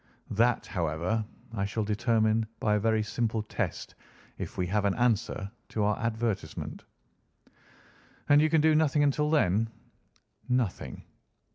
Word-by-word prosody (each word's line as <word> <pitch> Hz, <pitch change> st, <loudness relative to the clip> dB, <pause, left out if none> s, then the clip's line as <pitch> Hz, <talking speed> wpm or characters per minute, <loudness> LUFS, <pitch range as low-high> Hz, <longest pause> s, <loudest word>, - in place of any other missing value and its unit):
That, 115 Hz, +3 st, +2 dB
however, 85 Hz, +5 st, -1 dB, 0.3 s
I 100 Hz, -3 st, -1 dB
shall 105 Hz, +2 st, -2 dB
determine 110 Hz, 0 st, +1 dB
by 105 Hz, -, +2 dB
a 105 Hz, -, +3 dB
very 110 Hz, 0 st, +2 dB
simple 110 Hz, 0 st, -1 dB
test 105 Hz, -, -4 dB, 0.5 s
if -, -, -6 dB
we 90 Hz, -, +1 dB
have 100 Hz, +3 st, 0 dB
an 100 Hz, -, +2 dB
answer 110 Hz, -4 st, 0 dB, 0.2 s
to 110 Hz, -, -1 dB
our 105 Hz, 0 st, +2 dB
advertisement." 115 Hz, -2 st, -3 dB, 1.4 s
"And 145 Hz, +1 st, +6 dB
you 155 Hz, -, +3 dB
can 160 Hz, -1 st, +4 dB
do 160 Hz, 0 st, +5 dB
nothing 150 Hz, -1 st, +3 dB
until 150 Hz, +1 st, +2 dB
then?" 115 Hz, -, +2 dB, 0.8 s
"Nothing." 125 Hz, -6 st, -1 dB
110 Hz, 135 wpm, -29 LUFS, 105-125 Hz, 1.4 s, And